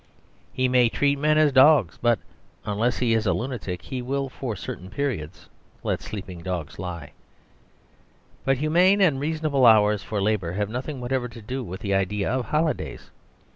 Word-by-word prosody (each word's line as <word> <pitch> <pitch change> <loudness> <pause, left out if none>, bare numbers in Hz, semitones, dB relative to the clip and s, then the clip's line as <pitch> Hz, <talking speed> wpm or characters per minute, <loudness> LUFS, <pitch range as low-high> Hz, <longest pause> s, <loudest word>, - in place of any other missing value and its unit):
He 130 0 0
may 125 -2 +4
treat 140 +3 +1
men 155 +1 +3
as 155 -1 +4
dogs, 130 - +5
but 120 -1 +3 0.5
unless 110 +3 0
he 120 -2 +1
is 110 -1 +1
a 90 - +3
lunatic 105 -9 -4
he 125 +9 -5
will 135 +2 -2
for 125 -3 -5
certain 90 0 -7
periods 100 - -4 0.4
let - - -1
sleeping 95 -4 -7
dogs 85 -4 -5
lie. 85 -5 -6 1.3
But 135 0 +2
humane 175 +7 +3
and 160 -9 +3
reasonable 155 -2 0
hours 105 -3 +5
for 100 +1 -3
labour 100 -4 0
have 105 +2 -2
nothing 130 +3 -5
whatever 125 0 -2
to 115 0 -11
do 130 +4 -4
with 95 -2 -7
the 100 -2 -1
idea 100 +2 0
of 130 -1 -1
holidays. 155 0 -2
120 Hz, 170 wpm, -24 LUFS, 100-135 Hz, 1.3 s, dogs